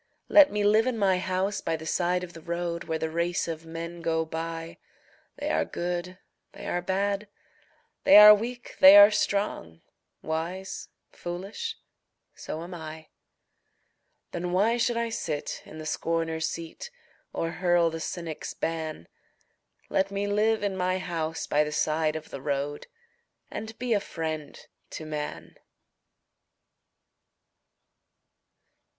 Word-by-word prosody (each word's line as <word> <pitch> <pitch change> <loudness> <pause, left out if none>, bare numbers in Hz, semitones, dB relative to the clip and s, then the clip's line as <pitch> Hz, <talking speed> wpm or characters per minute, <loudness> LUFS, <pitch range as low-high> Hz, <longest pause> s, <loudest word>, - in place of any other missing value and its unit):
Let 300 -2 +8
me 210 0 0
live 215 +3 +4
in 250 -3 0
my 190 -3 +3
house 185 +2 -1
by 165 - -1
the 160 0 -8
side 180 +2 0
of 175 -1 -8
the 165 - -11
road, 170 0 -3
Where 160 -1 -1
the 160 0 -3
race 170 +2 0
of 165 0 -5
men 170 +1 -6
go 160 -1 0
by 165 +1 -5 0.6
They - - -2
are 80 +1 +2
good, 175 - -4 0.4
they - - -10
are 175 - -1
bad, 200 +3 -1 0.8
they 290 - +8
are 210 0 +12
weak, 240 +3 -4
they 190 +2 +10
are 205 +1 +10
strong, 200 - -1 0.4
Wise, 170 +4 -4 0.2
foolish 195 - -5 0.6
so 160 - -6
am 175 +2 -8
I. 160 -2 -8 1.2
Then 175 +1 -3
why 210 +6 +3
should 240 0 +1
I 235 0 0
sit 155 -9 -3
in 155 - -11
the 155 - -7
scorner's 165 0 -1
seat, 170 - -7 0.4
Or 165 - -2
hurl 175 -2 +2
the 165 - -5
cynic's 165 -1 -5
ban? 160 - -4 0.8
Let 190 +1 +1
me 200 0 -2
live 210 +2 +1
in 200 -2 0
my 185 0 0
house 165 -3 -3
by 150 +1 +2
the 150 - -4
side 155 0 +1
of 155 0 -7
the 135 - -6
road 145 +1 -3 0.6
And 220 +1 -6
be 245 -1 0
a 205 - +3
friend 160 -5 -5 0.3
to 160 - -7
man. 150 -1 -6
175 Hz, 140 wpm, -27 LUFS, 160-200 Hz, 1.2 s, are